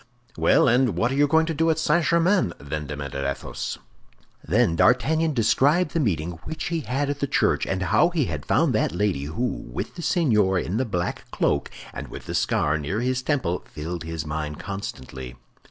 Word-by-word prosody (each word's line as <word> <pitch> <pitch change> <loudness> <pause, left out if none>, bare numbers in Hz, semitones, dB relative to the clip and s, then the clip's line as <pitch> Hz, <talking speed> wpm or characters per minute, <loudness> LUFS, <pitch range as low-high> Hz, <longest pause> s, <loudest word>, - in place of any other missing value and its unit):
"Well, - - +4
and 120 -4 +3
what 120 +7 +1
are - - -1
you 145 +1 +4
going 160 +3 +4
to 165 - -2
do 165 +2 +1
at 160 - +2
St. 160 +1 +2
Germain?" 170 - +2
then 75 +1 -5
demanded 70 -2 -5
Athos. 70 0 -4 0.7
Then 105 0 +2
D'Artagnan 150 - +3
described 145 +9 +3
the 165 - 0
meeting 85 - -1
which 160 0 -4
he 170 -1 -1
had 140 0 -1
at 145 - -5
the 140 - 0
church, - - +1
and 95 0 -1
how 105 - +4
he 165 -6 0
had 80 -7 -4
found - - +3
that - - +1
lady 90 -7 0
who, 105 +12 -3
with - - -4
the 175 - -7
seigneur 110 - +2
in 90 +3 -1
the 130 - +1
black 90 -6 -3
cloak 70 - 0 0.2
and - - -6
with - - -9
the - - -5
scar 75 +1 +1
near 95 +10 -2
his 125 +1 0
temple, 125 - -1
filled 80 +2 -5
his 80 -1 -5
mind 75 0 -4
constantly. 65 -10 -7
110 Hz, 195 wpm, -24 LUFS, -, 0.7 s, Well